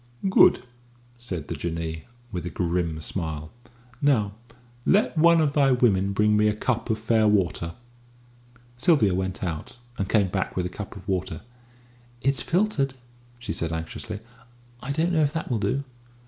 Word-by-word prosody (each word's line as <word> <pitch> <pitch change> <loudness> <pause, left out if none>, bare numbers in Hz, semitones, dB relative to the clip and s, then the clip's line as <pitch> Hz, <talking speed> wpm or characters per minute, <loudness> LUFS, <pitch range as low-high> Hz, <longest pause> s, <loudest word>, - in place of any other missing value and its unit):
"Good," 190 - +6 0.6
said 90 -11 -5
the - - -3
Jinnee, 80 0 -4 0.3
with 90 -5 -4
a - - -2
grim 85 -1 -1
smile. 80 -1 -4 0.5
"Now 120 -8 +3 0.5
let 205 - +3
one 170 +1 +6
of 150 -3 +2
thy 140 -2 +4
women 100 -6 +3
bring 105 +1 +3
me 105 0 +4
a 105 - +1
cup 115 +1 -1
of 110 - +1
fair 110 0 +2
water." 90 -5 +1 1.0
Sylvia 120 - +4
went 95 +1 -2
out, 85 +6 -4 0.2
and 95 - -1
came 100 -4 +3
back 95 +1 -2
with 90 - 0
a - - -2
cup 105 +1 -8
of 95 - -11
water. 95 -1 -2 0.8
"It's 135 +1 +2
filtered," 165 -8 +1 0.4
she 120 -7 -4
said 85 0 -2
anxiously; 90 +6 -5 0.6
"I 140 - -4
don't 165 +5 +1
know 160 - +3
if 145 -1 +1
that 160 -5 -3
will 115 - +1
do?" 105 +8 0
105 Hz, 160 wpm, -25 LUFS, 90-135 Hz, 1.0 s, Good